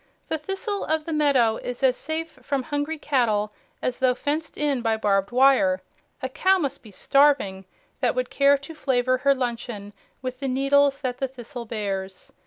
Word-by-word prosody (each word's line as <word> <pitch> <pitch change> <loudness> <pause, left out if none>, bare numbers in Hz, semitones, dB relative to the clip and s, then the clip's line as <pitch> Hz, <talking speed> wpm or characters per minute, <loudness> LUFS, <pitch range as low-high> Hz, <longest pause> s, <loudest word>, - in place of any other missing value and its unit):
The 320 - -1
thistle 390 +5 -3
of 315 0 0
the 330 - -3
meadow 270 -7 +3
is 250 +2 -6
as 260 -1 +4
safe 315 +2 -5
from 275 -3 -2
hungry 290 +3 -2
cattle 220 -8 0 0.3
as 250 - -1
though 255 -1 +3
fenced 300 +4 -3
in 285 -4 0
by 225 -1 +1
barbed 200 -2 +1
wire. 275 +2 +4 0.4
A - - +1
cow 380 +8 +3
must 280 -6 -3
be 220 - -14
starving 235 -4 +2 0.3
that - - +1
would - - -2
care 280 0 +4
to 280 +4 -10
flavor 255 -4 +1
her 275 +1 +3
luncheon 235 -5 -4 0.3
with 255 0 -4
the 275 - -3
needles 275 +1 +3
that 250 -2 -3
the 270 - 0
thistle 245 -1 -9
bears. 195 -4 -4
265 Hz, 180 wpm, -24 LUFS, 240-290 Hz, 0.4 s, as